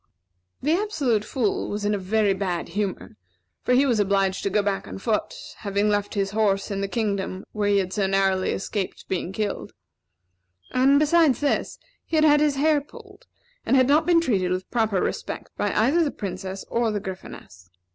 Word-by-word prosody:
The 300 - +2
Absolute 300 - 0
Fool 215 -1 -1
was 205 0 -3
in 210 - +1
a 205 - -1
very 200 +1 +1
bad 185 -3 -3
humor; 200 - -4 0.4
for 250 - +2
he 270 +3 +4
was 240 -5 +2
obliged 195 -1 +1
to - - -1
go 205 +1 +1
back 200 -1 -2
on - - -7
foot, 210 +1 -1 0.2
having 200 0 0
left 205 0 -1
his 195 -1 0
horse 205 -2 +1
in 200 0 -2
the 200 - -1
kingdom 200 -3 -2
where 210 -1 -1
he 200 - +4
had 190 -1 -1
so 200 -3 +1
narrowly 190 -1 +1
escaped 195 0 -4
being 185 -1 -2
killed; 210 +1 -3 1.0
and, 265 +2 +4
besides 305 -2 +4
this, 290 - -1 0.3
he - - -4
had 310 0 +4
had 295 -1 +6
his 295 -1 +2
hair 295 +1 +3
pulled; 395 +5 -15 0.4
and - - +2
had 255 -1 +4
not 300 +4 +3
been 345 -1 +5
treated 195 - 0
with 185 +1 -3
proper 220 -5 +1
respect - - -4
by - - -1
either 275 +11 +3
the 300 - 0
Princess 190 -3 -6
or 235 -1 +1
the 210 -1 -1
Gryphoness. 185 - -10
210 Hz, 190 wpm, -24 LUFS, 195-270 Hz, 1.0 s, had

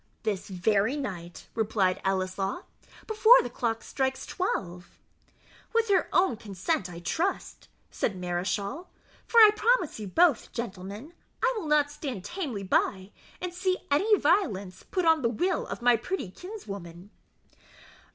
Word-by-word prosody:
"This 205 -4 -2
very 200 +6 +1
night," 175 -11 -6
replied 205 -4 +1
Ellieslaw, 190 - -1 0.4
"before 440 +3 +7
the 245 - -6
clock 230 -2 -2
strikes 265 -1 -2
twelve." 180 - -4 0.8
"With 455 -1 +2
her 380 -3 +3
own 360 -11 +3
consent, 200 - -2
I 170 - -9
trust," 350 - -2 0.2
said 195 - -2
Mareschal; 200 - -2 0.4
"for 470 - 0
I 430 -2 +10
promise 445 - +1
you 210 - -5
both, 315 - +3
gentlemen, 210 - -6 0.3
I - - +3
will 415 -8 -4
not 295 -1 +3
stand 275 - -5
tamely 290 - -4
by, 190 +1 0 0.3
and 360 -1 -4
see 370 +1 0
any 415 +9 +4
violence 215 - +1
put 365 -3 0
on 320 -1 +4
the 230 - +2
will 350 - -1
of - - -6
my 245 0 +6
pretty 240 - -4
kinswoman." 200 - -9
235 Hz, 140 wpm, -28 LUFS, -, 0.8 s, I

